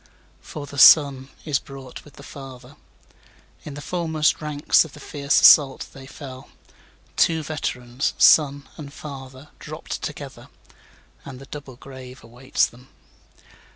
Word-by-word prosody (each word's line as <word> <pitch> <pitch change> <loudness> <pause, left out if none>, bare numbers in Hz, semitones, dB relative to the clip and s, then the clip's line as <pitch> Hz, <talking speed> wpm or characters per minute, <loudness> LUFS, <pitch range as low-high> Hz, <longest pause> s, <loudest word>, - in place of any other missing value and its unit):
5For 145 -2 -8
the 140 0 -7
son 135 -3 +6 0.2
is 150 -3 0
brought 135 -2 -11
with 145 - -17
the - - -13
father; 135 -1 -12 0.9
In 145 - -8
the 145 - -8
foremost 160 -4 0
ranks 150 0 +2
of 160 - -12
the - - -12
fierce 140 0 0
assault 140 -3 +6
they 135 -1 -12
fell; 135 -1 -11 0.7
Two 160 -2 +2
veterans, 125 -4 -3
son 145 -2 +4
and 145 -3 -9
father, 135 -1 -10
dropt - - -7
together, - - -8 0.8
And 135 -2 -10
the 135 - -12
double 140 -2 -10
grave 130 -1 -12
awaits 120 +3 -1
them. 125 +2 -14
140 Hz, 135 wpm, -22 LUFS, 130-150 Hz, 0.9 s, son